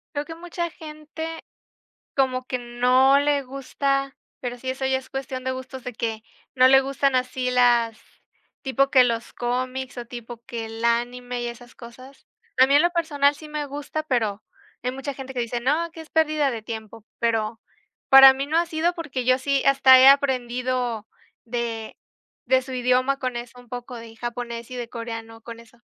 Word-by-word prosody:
Creo 290 - -2
que 325 - -8
mucha 345 0 -4
gente 315 +1 -8 0.7
como 255 -1 +1
que 255 - -2
no 250 +3 +3
le 285 -1 +1
gusta, 275 +1 -2 0.2
pero 245 -1 -4
sí, 260 +1 -4
eso 265 0 -2
ya 265 0 +2
es 260 0 -8
cuestión 265 -1 -5
de 260 - -1
gustos 260 0 -8
de 250 - -5
que 220 -1 -4 0.3
no 255 0 +6
le 270 +1 +7
gustan 275 0 0
así 255 0 0
las 240 -2 +3 0.6
tipo 275 0 +1
que 255 -2 +6
los 235 -1 -2
cómics, 255 +1 -3
o 240 - -6
tipo 235 -1 -9
que 235 -3 -5
el 225 +1 -7
anime 245 +1 -1
y 240 - -2
esas 240 +1 -11
cosas. 255 +3 -14 0.3
A 260 - +8
mí, 280 - +2
en 295 - +6
lo 345 - +3
personal, 290 -4 +2
sí 305 +1 -12
me 300 -1 -4
gusta, 290 +2 -5
pero 225 -8 -1 0.4
hay 250 - -1
mucha 270 +2 -5
gente 265 0 -8
que 245 - -1
dice: 235 0 -2
"No, 310 +7 0
que 325 - -10
es 320 - -12
pérdida 305 -3 +2
de 230 -3 -5
tiempo", 220 0 -8
pero 225 -1 -1 0.5
para 270 0 +10
mí, 270 +1 -4
no 320 +3 +1
ha 340 - +3
sido 335 +1 0
porque 280 -7 -4
yo 255 0 +4
sí 275 +1 0
hasta 265 -1 +7
he 265 - +9
aprendido 250 -4 +1 0.4
de 230 -2 -4 0.5
de 260 +1 +3
su 260 - -9
idioma 255 +2 +1
con 255 -3 -3
eso 245 +1 -8
un 245 - -19
poco 245 0 -7
de 230 -1 -11
japonés, 240 0 -6
y 250 - -6
de 240 -1 -5
coreano 225 -1 -7
con 230 0 -9
eso, 230 0 -19
255 Hz, 190 wpm, -24 LUFS, 240-275 Hz, 0.7 s, para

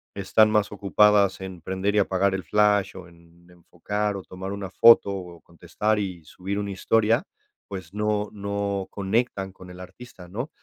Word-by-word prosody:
están 105 +2 +3
más 105 -1 +1
ocupadas 100 -1 +3
en 95 -2 -8
prender 95 +4 -2
y 105 - +4
apagar 95 0 +1
el 95 - -4
flash, 105 +1 +2
o 95 -2 -10
en 85 +1 -22
enfocar 100 +4 -4
o 95 - -8
tomar 95 +2 -7
una 100 -1 -5
foto, 115 0 +6
o 90 -3 -7
contestar 105 +6 -2
y 95 -5 -4
subir 100 +5 -5
una 100 -1 -4
historia, 110 +3 +1 0.4
pues, 95 -3 -8
no 105 0 -1
no 100 -1 -3
conectan 100 -1 -1
con 90 -1 -14
el 90 - -12
artista, 90 0 -12
¿no?, 120 - -5
100 Hz, 170 wpm, -24 LUFS, 90-105 Hz, 0.4 s, foto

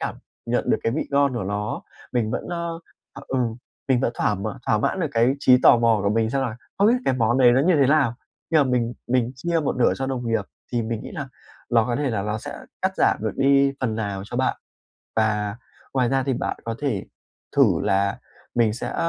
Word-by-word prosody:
cảm - - -3 0.3
nhận - - 0
được - - +4
cái 115 - 0
vị 155 - 0
ngon 140 -2 +2
của 115 - -2
nó. 105 +2 -3 0.3
Mình 115 -3 0
vẫn - - -4
a, 170 -1 -3 0.5
à, - - -10
ừ, 130 - -1 0.5
mình 130 -2 +3
vẫn 120 -2 0
thỏa 105 - 0 0.3
thỏa 110 - +3
mãn 185 - 0
được 165 - +1
cái 120 +4 +3
trí 125 -2 +6
tò - - +8
mò 115 -2 +3
của 100 - +2
mình, 110 +1 +1
xem 135 +1 0
là: 115 -3 -3 0.2
"Không 200 - +5
biết 235 - +5
cái 130 - +2
món 120 0 +2
đấy 125 -2 +6
nó 130 - +4
như 175 +4 +3
thế 135 - +5
nào?" 140 -5 +3 0.4
Khi 165 - +3
mà 145 - +5
mình 120 -2 0 0.2
mình 125 -1 +1
chia 170 +4 0
một 145 - -1
nửa 125 - +3
cho 135 - -2
đồng 125 -2 -3
nghiệp, 115 -1 +1 0.3
thì 120 - +1
mình 110 0 -3
nghĩ - - -8
là 140 -3 -5 0.4
ló 115 -2 +3
có 120 - -1
thể 140 -3 0
là 100 -3 -1
nó 105 +1 -2
sẽ - - -7 0.2
cắt - - +1
giảm - - +3
được - - -1
đi 140 0 +4
phần 115 -4 -1
nào 100 -3 -3
cho 120 - -6
bạn. 130 - +1 0.6
Và 105 -1 +1 0.4
ngoài 125 -3 +2
ra, 135 -1 +1
thì 135 - -1
bạn - - -2
có 115 0 -3
thể 135 -10 -2 0.5
thử - - +7 0.2
là 100 -1 +1 0.4
mình 115 -3 +3
sẽ 120 +2 -5
120 Hz, 235 wpm, -23 LUFS, 110-135 Hz, 0.6 s, tò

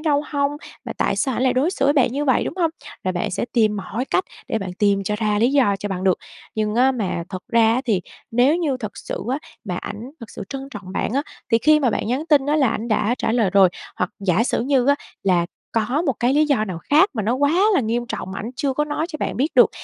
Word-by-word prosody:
đâu 295 -2 +1
hông? 280 -1 0 0.3
Và - - -4
tại - - +1
sao 265 -4 0
ảnh - - 0
lại 255 - +3
đối 280 +8 +2
xử 275 - -1
với 285 - +5
bạn 255 -4 +3
như 290 +2 -1
vậy, 260 -3 +2
đúng - - -4
hông? 335 -3 +2 0.3
Là 185 - 0
bạn 200 +4 -2
sẽ 190 - -2
tìm 215 -3 +2
mọi 225 +5 -3
cách 370 - 0 0.2
để 225 - 0
bạn 190 -3 -5
tìm 200 -2 +2
cho 210 +2 -1
ra 210 -1 0
lý 240 +5 +3
do 245 -9 +3
cho 205 - -4
bằng 185 -1 -3
được. 185 -2 +3 0.4
Nhưng 215 -1 -1
á 260 +2 +4
mà 195 -8 -2
thật 185 - -5
ra 225 -1 +5
á 255 - +1
thì 210 -7 +1 0.3
nếu 250 +7 +4
như 300 -7 0
thật 215 -5 -7
sự - - -5
á 270 - 0 0.3
mà 180 -4 -3
ảnh 230 +8 -6
thật 230 - -10
sự - - -7
trân 270 0 -6
trọng 195 -3 -8
bạn 215 - -2
á 280 +2 +1 0.3
thì 225 - +6
khi 305 +4 +4
mà 250 -4 +2
bạn - - -2
nhắn 265 +7 -1
tin 290 -4 +4
á 300 +1 +2
là 270 -5 +3
ảnh 230 +2 -3
đã 215 +2 +1
trả 225 - 0
lời 225 -6 +2
rồi, 195 -1 +6 0.3
hoặc 180 - -1
giả 195 +3 +2
sử - - 0
như 265 -1 +2
á 285 - +5 0.3
là 175 -3 +2 0.3
có 245 +8 0
một 270 - +3
cái 250 +3 +2
lý 305 +1 +4
do 260 -7 +2
nào 185 -5 -5
khác 310 - +3
mà 215 - -1
nó 230 +5 +1
quá 285 +3 +2 0.2
là - - +4
nghiêm 240 +1 -1
trọng 190 - -5
mà - - -5
ảnh 225 - -5
chưa 275 -2 0
có 295 +3 0
nói 300 +2 -2
cho 310 - -5
bạn - - -2
biết 280 +6 0
được. - - +6
240 Hz, 280 wpm, -21 LUFS, 210-280 Hz, 0.4 s, thì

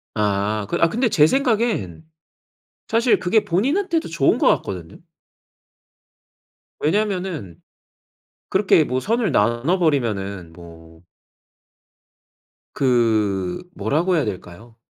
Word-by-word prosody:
아. 105 0 -1
아 165 - +4
근데 235 +6 0
제 150 -7 +4
생각엔 225 - 0 0.9
사실 230 +2 +2
그게 200 +4 +1
본인한테도 320 - 0
좋은 160 -4 +1
것 - - +1
같거든요. 85 -3 -8 1.8
왜냐하면은 180 - -2 0.9
그렇게 190 -4 +3
뭐 130 -3 -2
선을 225 - 0
나눠버리면은 115 - 0
뭐. 80 0 -15 1.7
그 110 - 0
뭐라고 175 +5 0
해야 155 -5 +1
될까요. 105 +3 -8
135 Hz, 205 characters per minute, -21 LUFS, -, 1.8 s, 아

